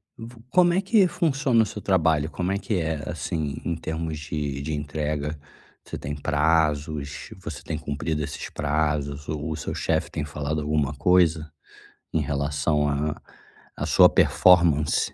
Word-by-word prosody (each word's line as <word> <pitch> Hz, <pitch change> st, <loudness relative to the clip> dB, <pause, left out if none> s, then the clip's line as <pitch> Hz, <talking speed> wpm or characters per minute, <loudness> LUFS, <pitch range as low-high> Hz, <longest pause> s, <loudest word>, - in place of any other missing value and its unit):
Vo 115 Hz, 0 st, -11 dB
como 175 Hz, +1 st, +4 dB
é 190 Hz, -, +2 dB
que 200 Hz, -1 st, +4 dB
funciona 135 Hz, -9 st, +2 dB
o -, -, -1 dB
seu 105 Hz, 0 st, -7 dB
trabalho? 80 Hz, -5 st, +2 dB
Como 90 Hz, +5 st, -2 dB
é 100 Hz, -, 0 dB
que 100 Hz, +2 st, -2 dB
é, 80 Hz, -4 st, -3 dB
assim, 75 Hz, -3 st, -3 dB
em 85 Hz, -, -1 dB
termos 80 Hz, -1 st, -4 dB
de 75 Hz, -2 st, -4 dB
de 80 Hz, +2 st, -3 dB
entrega? 75 Hz, 0 st, -3 dB, 0.4 s
Você -, -, -7 dB
tem 70 Hz, +1 st, -5 dB
prazos, 75 Hz, -1 st, 0 dB
você 75 Hz, -4 st, -7 dB
tem 80 Hz, -, -4 dB
cumprido 75 Hz, 0 st, -3 dB
esses -, -, -6 dB
prazos? 75 Hz, -1 st, -1 dB
O 75 Hz, +1 st, -3 dB
seu -, -, -5 dB
chefe -, -, -1 dB
tem 75 Hz, -3 st, -3 dB
falado 75 Hz, +1 st, -3 dB
alguma 75 Hz, -1 st, 0 dB
coisa 80 Hz, 0 st, +3 dB, 0.6 s
em -, -, +2 dB
relação 75 Hz, +1 st, 0 dB
à 75 Hz, +1 st, -2 dB, 0.5 s
à -, -, -3 dB
sua -, -, +6 dB
performance, 85 Hz, -5 st, +4 dB
75 Hz, 155 wpm, -25 LUFS, 75-85 Hz, 0.6 s, sua